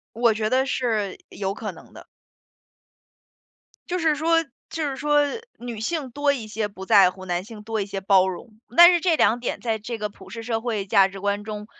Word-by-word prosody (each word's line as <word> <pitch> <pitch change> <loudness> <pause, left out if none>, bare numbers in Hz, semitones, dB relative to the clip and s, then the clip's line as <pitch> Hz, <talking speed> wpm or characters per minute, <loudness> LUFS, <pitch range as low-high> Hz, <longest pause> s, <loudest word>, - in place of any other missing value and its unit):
我 230 -1 +3
觉 215 0 -1
得 260 +1 +2
是 220 -7 -1
有 195 -1 -3
可 - - -5
能 - - -16
的。 - - -12 1.8
就 360 +1 -1
是 320 -2 +2
说 330 +2 +2 0.3
就 315 -2 -2
是 270 - -4
说 295 0 +3 0.4
女 235 -3 -7
性 270 +2 -3
多 285 +3 +1
一 240 -6 -5
些 215 0 -3
不 190 -1 -10
在 195 -4 +6
乎， 190 0 -12
男 175 0 -2
性 215 -1 -11
多 225 0 -3
一 200 - -2
些 195 -1 -5
包 190 -1 +4
容。 215 +4 -8 0.2
但 345 +1 +10
是 345 - +2
这 335 -2 +2
两 235 -4 +3
点 240 - -3
在 225 -2 -1
这 225 +2 -6
个 210 0 -2
普 190 -2 -15
世 230 +3 -7
社 225 -1 -2
会 220 -5 -3
价 195 0 +5
值 195 0 -10
观 205 +1 -1
中， 210 -1 -6
220 Hz, 230 characters per minute, -24 LUFS, 200-265 Hz, 1.8 s, 但